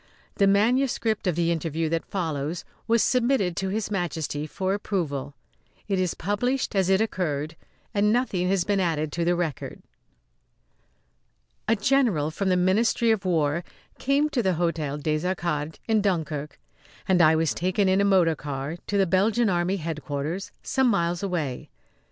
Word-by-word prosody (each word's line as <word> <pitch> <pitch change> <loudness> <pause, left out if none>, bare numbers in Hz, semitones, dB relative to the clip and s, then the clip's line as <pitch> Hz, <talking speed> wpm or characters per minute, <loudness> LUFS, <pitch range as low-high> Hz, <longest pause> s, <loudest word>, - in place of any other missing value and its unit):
The 200 - +4
manuscript 225 +1 +2
of 175 - +1
the 170 0 +1
interview 165 -1 -1
that 165 0 -2
follows 160 -3 -3 0.2
was 230 0 +3
submitted 240 -8 +2
to 190 - -1
His 210 +1 -2
Majesty 160 -5 -2
for 190 +4 -2
approval. 145 -9 -3 0.5
It 195 -2 0
is 180 -2 0
published 230 +7 -1
as 190 -1 +2
it 190 +2 +4
occurred, 160 -7 -2 0.4
and 210 +1 +3
nothing 205 -7 +1
has 190 -2 +2
been 200 +1 0
added 155 -4 0
to 170 - -1
the 175 +1 +2
record. 165 -6 -4 1.8
A 225 - +4
general 210 - +2
from 190 +4 -1
the 185 - +3
Ministry 220 +5 +2
of 210 -3 0
War 165 -2 +1 0.4
came 280 +3 +2
to 265 -5 0
the 190 -4 +1
Hôtel 155 -4 -2
des 155 0 0
Arcades, 170 -4 -2
in 220 -2 +3
Dunkirk, 155 -7 -2 0.5
and 185 -2 +4
I 160 -1 +6
was 160 -1 +1
taken 185 +3 0
in 190 +1 +3
a - - +3
motor 185 -5 +4
car 145 +2 -5
to 205 - 0
the 195 - +4
Belgian 210 +6 +2
Army 175 +2 +1
headquarters 155 +1 -4
some 265 -1 +1
miles 175 -6 +1
away. 165 -10 -3
180 Hz, 160 wpm, -25 LUFS, 160-205 Hz, 1.8 s, I